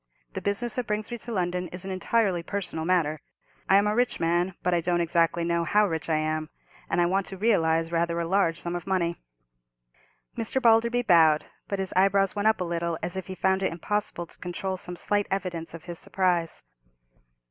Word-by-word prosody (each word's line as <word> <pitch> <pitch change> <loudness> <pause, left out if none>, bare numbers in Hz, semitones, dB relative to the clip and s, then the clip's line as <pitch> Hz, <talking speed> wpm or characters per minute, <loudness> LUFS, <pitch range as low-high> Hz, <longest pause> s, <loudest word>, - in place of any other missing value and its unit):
The - - -4
business 215 +4 -1
that 250 -3 -2
brings 210 +2 -2
me 240 - -4
to 240 - -7
London 180 -3 -1
is 180 +2 -6
an 195 - -4
entirely 190 -1 +1
personal 175 -3 -3
matter. 160 -4 +1 0.5
I 195 - +6
am 200 +1 +5
a 210 - +1
rich 245 +1 +1
man, 175 +2 +1
but 180 - +1
I 170 - +2
don't 175 +1 +1
exactly 170 0 +2
know 170 0 +1
how 210 +6 +3
rich 160 -2 -4
I 155 - +2
am, 155 0 -2 0.4
and - - +1
I 175 - +4
want 190 +2 0
to 195 - -7
realize 165 -6 +2
rather 170 0 0
a 170 - -1
large 170 -2 +1
sum 175 0 -4
of 175 - -5
money." 170 -3 0 1.2
Mr. 225 +4 -1
Balderby 235 0 +4
bowed, 160 -7 +5 0.2
but 200 - -2
his 190 -1 -3
eyebrows 195 +1 +3
went 205 +1 +1
up 220 - +3
a - - 0
little, 170 -1 -2
as 175 - -3
if 190 - -5
he 190 - -6
found 190 +1 +1
it 190 - +1
impossible 175 +1 -2
to - - -12
control 185 +2 -3
some 180 -1 -4
slight 205 +3 0
evidence 175 -4 -3
of 165 - -11
his 175 -2 -6
surprise. 180 -4 0
180 Hz, 210 wpm, -26 LUFS, 170-200 Hz, 1.2 s, I